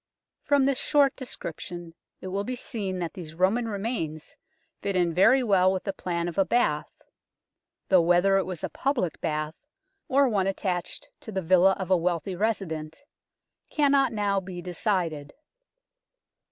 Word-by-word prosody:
From 285 -2 +3
this 275 -1 +1
short 285 -2 +3
description 175 - -7 0.3
it 185 - -6
will 195 +2 -2
be 255 +4 -3
seen 200 -6 -4
that 170 -2 -4
these 165 -4 -8
Roman 200 +7 +2
remains 195 -8 -4 0.5
fit 200 -1 -2
in 175 -2 +2
very 255 +9 +5
well 190 -4 +4
with 190 -1 -2
the 195 - -3
plan 175 -2 -3
of 175 +2 -3
a - - +6
bath, 170 -10 +1 1.0
though 185 -2 +6
whether 175 +3 +4
it 195 - 0
was 180 -4 -5
a - - -1
public 255 - -1
bath, 155 -1 -2 0.5
or 275 +1 +4
one 200 -5 +1
attached 185 -2 -3
to 220 - -9
the 190 -2 -2
villa 185 +3 +5
of 190 -1 -5
a 185 - +6
wealthy 175 +1 -1
resident, 175 - -3 0.7
cannot 280 -3 +3
now 205 -3 0
be 185 -1 -8
decided. 175 -5 -2
190 Hz, 155 wpm, -26 LUFS, 175-220 Hz, 1.0 s, a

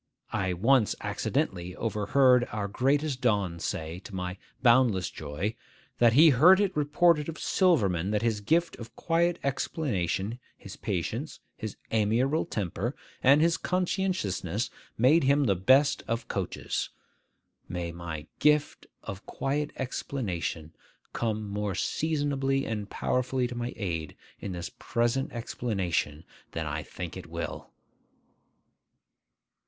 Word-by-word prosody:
I 95 -1 0
once 115 +5 +3
accidentally 90 0 -2
overheard 125 +4 +3
our 105 -1 -2
greatest 135 +5 0
don 100 -8 +1
say, 80 +1 -4
to 95 - -10
my 90 +1 -4 0.2
boundless 115 -7 +4
joy, 80 +8 -3 0.5
'That 120 -2 +6
he 155 +5 +8
heard 175 +9 +7
it 200 -2 +1
reported 150 +1 +3
of 160 - -6
Silverman 100 - +2
that 105 +1 0
his 110 -3 0
gift 165 +10 +1
of 115 0 -10
quiet 170 +1 +1
explanation, 120 - -1 0.2
his 100 - -10
patience, 110 - -3 0.2
his 110 -2 -6
amiable 115 +8 +2
temper, 105 +5 -3 0.3
and 140 +3 +6
his 170 0 +3
conscientiousness 175 - -1 0.3
made 135 +6 +5
him 140 +2 +4
the 105 -7 +3
best 130 +10 +4
of 115 +1 -2
coaches.' 95 -3 -3 0.8
May 85 -1 -3
my 85 -3 -6
'gift 150 -1 +2 0.2
of 95 0 -8
quiet 145 +2 -1
explanation' 95 - -3 0.4
come 110 -2 -2
more 100 -1 -2
seasonably 140 - 0
and 105 -2 -4
powerfully 130 0 0
to 125 - -7
my 120 +1 -3
aid 80 -7 -3 0.2
in 95 - -5
this 85 0 -5
present 120 +2 0
explanation 95 -10 -2 0.3
than 80 -1 -2
I 75 +1 -3
think - - -7
it - - -8
will! - - -5
115 Hz, 125 wpm, -28 LUFS, 95-140 Hz, 0.8 s, he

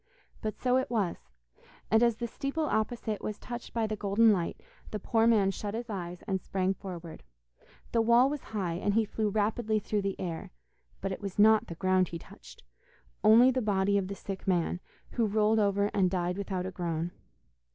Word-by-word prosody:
But 215 -1 -3
so 250 0 +2
it 260 - -1
was; 210 -7 0 0.7
and 220 +1 +5
as 235 -2 +4
the 235 +1 -4
steeple 275 +6 -3
opposite 220 -3 -1
was 210 - -4
touched 240 -1 -7
by 230 -1 0
the 215 0 -2
golden 210 +2 +4
light, 175 -4 -2 0.3
the 215 - -3
poor 225 +2 +2
man 205 -4 +4
shut 205 +2 -5
his 235 0 -5
eyes 175 -3 -5
and 190 -2 -1
sprang 190 0 0
forward. 175 -4 -8 0.7
The 230 - +3
wall 235 +3 +5
was 290 0 -4
high, 195 -6 -2
and 205 +1 0
he 225 -1 +3
flew 215 +1 -1
rapidly 215 +1 0
through 210 0 -1
the 195 -1 -3
air, 170 -3 -4 0.5
but 195 - -2
it 190 - -5
was 195 -2 -5
not 215 +1 +5
the 170 - -6
ground 185 +1 +2
he 170 - -5
touched, - - -14 0.6
only 235 +4 +7
the 255 0 0
body 200 -2 +1
of 195 -2 +1
the 200 - -5
sick 195 -1 -7
man, 180 -1 +1 0.3
who 230 -3 +1
rolled 215 +1 +3
over 200 0 +2
and 190 -2 +3
died 180 -1 -1
without 190 -2 -3
a 185 - -4
groan. 170 -1 -2
205 Hz, 195 wpm, -30 LUFS, 190-225 Hz, 0.7 s, only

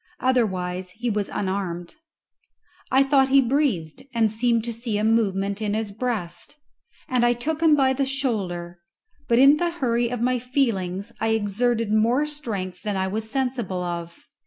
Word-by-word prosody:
Otherwise 185 -8 0
he 240 +1 -1
was 205 -1 -1
unarmed. 185 -3 -3 0.9
I 265 +1 +5
thought 270 -1 +3
he 275 +1 +6
breathed, 245 - 0
and 225 -2 +3
seemed 230 0 +1
to 235 0 -3
see 230 -2 -3
a 210 - -1
movement 200 -2 +1
in 210 -1 -1
his 220 -2 -2
breast, 220 - -4 0.5
and 250 -1 +1
I 240 0 +4
took 300 +7 -3
him 320 -2 +6
by 265 -2 +3
the 270 0 0
shoulder; 190 -11 -3 0.5
but 235 - +3
in 275 +3 +7
the 345 +2 0
hurry 240 -8 0
of 245 -1 -3
my 250 +1 +1
feelings 230 -6 -1
I 225 - +1
exerted 225 +1 0
more 235 +7 +3
strength 215 -12 -5
than 205 -2 -2
I 190 - 0
was 220 +3 -3
sensible 245 -8 -2
of. 170 -1 -6
230 Hz, 165 wpm, -24 LUFS, 195-255 Hz, 0.9 s, in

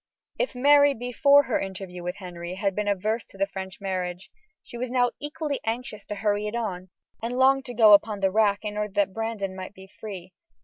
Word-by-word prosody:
If - - -1
Mary, 285 +2 +5
before 280 +4 +4
her 250 - 0
interview 190 -2 -6
with 180 +1 -4
Henry, 175 -2 -7
had 195 0 0
been 210 +2 -2
averse 215 +3 0
to - - -17
the 195 - +2
French 190 -1 -7
marriage, 185 -2 -4 0.3
she - - -12
was 245 +1 -3
now 245 -1 +2
equally 295 -1 -3
anxious 225 -1 -4
to 210 - -4
hurry 205 0 0
it 210 - -4
on, 190 -6 -4 0.3
and 240 +2 -3
longed 265 +1 +4
to 245 - -7
go 215 -2 +7
upon 205 0 +4
the 195 -1 +2
rack 205 0 +2
in 210 0 -4
order 210 -2 -3
that 200 -1 +1
Brandon 225 -4 -3
might 190 +2 -8
be 190 - -12
free. 190 -2 -9
210 Hz, 210 wpm, -26 LUFS, 190-240 Hz, 0.3 s, go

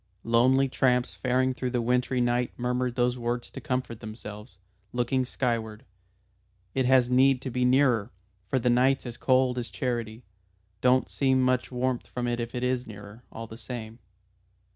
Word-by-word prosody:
Lonely 130 +4 +4
tramps 125 -1 +1
faring 130 0 +1
through 125 0 -3
the 125 0 -1
wintry 125 +2 +1
night 120 0 +1
murmured 125 0 -1
those 125 0 +1
words 120 0 -3
to - - -8
comfort 125 -5 -3
themselves 105 -1 -9 0.4
looking 125 +1 0
skyward. 115 -4 -2 0.9
"It 130 -2 +1
has 125 -1 +4
need 130 +1 +4
to 130 - -4
be 125 +1 +1
nearer, 125 -4 +3 0.4
for 130 - 0
the 125 -1 +2
night's 130 +3 +3
as 120 -1 -6
cold 130 -1 +2
as 120 - -5
charity. 120 -3 -3 0.6
Don't 130 +1 +3
seem 130 -2 +1
much 130 0 +1
warmth 125 0 -1
from 125 -1 -4
it 120 0 -1
if 120 +1 -4
it 125 - -2
is 125 0 0
nearer, 105 +1 -11
all 115 - -7
the 115 0 -11
same." 115 0 -7
125 Hz, 165 wpm, -27 LUFS, 120-130 Hz, 0.9 s, Lonely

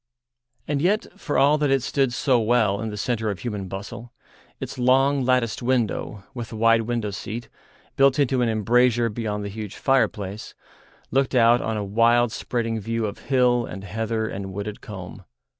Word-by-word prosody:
And 145 -1 -1
yet, 200 +6 +2
for 165 -7 -3
all 145 +2 +4
that 145 -1 +1
it 135 -2 +2
stood 135 -2 +1
so 125 +1 +2
well 110 -3 +2
in 110 - -3
the 105 - -6
centre 110 0 -1
of 100 - -4
human 105 -5 -4
bustle, 100 +5 -8 0.5
its - - -6
long, 135 +2 +3
latticed 125 -3 +1
window, 120 -4 -1
with 120 -3 -6
the - - -8
wide 115 +1 +4
window 115 -2 -2
seat, 110 +4 -6 0.5
built 135 -1 +4
into 135 -3 +2
an 120 - +2
embrasure 120 +2 +2
beyond 105 -2 -3
the - - -4
huge 105 0 -7
fireplace, 110 -6 -1 0.6
looked 135 0 +1
out 120 0 +5
on 110 -1 -2
a 105 - -2
wild 115 +3 +3
spreading 115 -1 -2
view 115 +2 -2
of 100 -1 -5
hill 125 -3 +3
and 95 +1 -8
heather 110 +2 -2
and 95 -2 -5
wooded 100 +2 -6
combe. 95 -5 -9
115 Hz, 175 wpm, -24 LUFS, 105-125 Hz, 0.6 s, out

